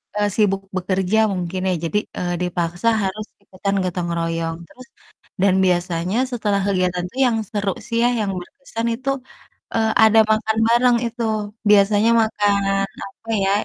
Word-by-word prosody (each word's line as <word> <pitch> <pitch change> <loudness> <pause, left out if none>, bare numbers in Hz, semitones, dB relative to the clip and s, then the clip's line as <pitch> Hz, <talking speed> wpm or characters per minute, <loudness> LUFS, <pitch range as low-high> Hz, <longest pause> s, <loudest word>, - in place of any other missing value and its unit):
eee, 210 0 +1
sibuk 195 -3 +2 0.2
bekerja 185 +2 0 0.2
mungkin, 180 0 -3
ya. 185 - +1
Jadi, 185 - 0 0.2
eee, 175 0 -2
dipaksa 175 +3 -2 0.2
harus 210 +3 -3 0.2
ikutan 195 +1 -3
gotong 180 -1 -2
royong, 165 0 -2
terus 255 +1 -15 0.5
dan 195 -1 +4
biasanya 175 +2 0
setelah 210 -4 0
kegiatan 180 -2 0
itu 255 - -15
yang 230 -2 +1
seru 205 -2 -1 0.2
sih 230 0 -1
ya, 245 - +4
yang 205 -2 -1
berkesan 230 +4 -6
itu, 265 +3 -4 0.7
eee, 220 -1 +2
ada 220 0 +5
makan 220 0 +1
bareng, 240 +1 +4
itu 235 +1 -5 0.5
biasanya 205 +2 +5
makan, 205 -2 +1 0.5
apa 225 +3 -12
ya, 195 - +2
200 Hz, 150 wpm, -21 LUFS, 180-220 Hz, 0.7 s, ada